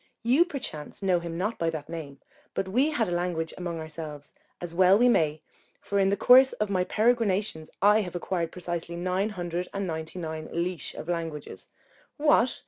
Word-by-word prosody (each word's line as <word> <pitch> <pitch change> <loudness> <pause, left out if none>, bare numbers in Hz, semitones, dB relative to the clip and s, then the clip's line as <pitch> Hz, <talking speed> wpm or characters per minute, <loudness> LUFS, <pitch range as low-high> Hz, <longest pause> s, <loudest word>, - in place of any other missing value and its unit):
You 260 +9 +4
perchance 230 - -6
know 185 -2 +3
him 170 -1 -5
not 205 +6 -2
by 165 - +1
that 155 -3 -5
name; 150 -5 -7 0.3
but 190 - -1
we 255 +10 +2
had 265 -8 0
a - - -3
language 175 -2 -1
among 175 -2 -4
ourselves, 155 -2 -8 0.3
as 175 -1 -6
well 185 +2 +6
we 245 +3 +5
may, 155 -9 +2 0.4
for 200 - -1
in 195 0 +4
the 200 - +1
course 260 +1 +7
of 210 -1 -2
my 185 -2 +2
peregrinations 215 -6 +1
I 210 +2 +6
have 180 -3 -6
acquired 175 -1 -2
precisely 175 -1 -4
nine 185 +4 0
hundred 175 -3 -3
and 200 0 -1
ninety 160 0 -5
nine 160 -2 -5
leash 170 -2 -2
of - - -7
languages. 165 -4 -4 0.5
What! 290 -5 +3
180 Hz, 185 wpm, -27 LUFS, 165-205 Hz, 0.5 s, course